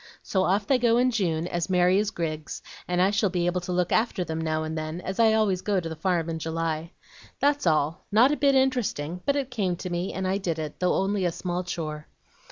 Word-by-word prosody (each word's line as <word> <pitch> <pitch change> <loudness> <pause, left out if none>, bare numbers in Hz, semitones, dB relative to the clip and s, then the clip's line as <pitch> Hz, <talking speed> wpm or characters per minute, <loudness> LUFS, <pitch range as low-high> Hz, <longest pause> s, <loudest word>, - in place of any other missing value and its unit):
So 190 -1 +1
off 200 +2 +1
they 265 +1 +3
go 235 -1 +3
in 250 +1 +3
June, 170 -8 0
as 175 0 -2
merry 180 +1 +4
as 210 0 0
grigs, 155 -6 -4 0.2
and 180 0 0
I 190 +2 +4
shall 205 0 +2
be 175 -1 -1
able 175 +1 0
to 180 - -5
look 180 0 0
after 220 -5 +1
them 160 -1 -4
now 155 -1 -1
and 155 0 -4
then, 155 +2 -4
as 190 +3 -5
I 225 -1 +5
always 205 -4 +2
go 200 -1 +1
to 170 - -5
the 160 - -5
farm 170 0 0
in 165 -1 -3
July. 165 +1 -3 0.5
That's 285 -7 +2
all, 155 0 +1
not 235 +7 +5
a - - +2
bit 280 -2 +3
interesting, 225 - 0
but 280 - +3
it 275 -2 -2
came 195 -7 0
to 180 +1 -6
me, 175 +2 -2
and 190 0 -3
I 190 +1 0
did 170 -5 -2
it, 155 -2 -5
though 180 -1 +2
only 195 0 0
a 175 - +1
small 180 +1 -3
chore." 155 -3 -5
180 Hz, 245 wpm, -26 LUFS, 165-210 Hz, 0.5 s, I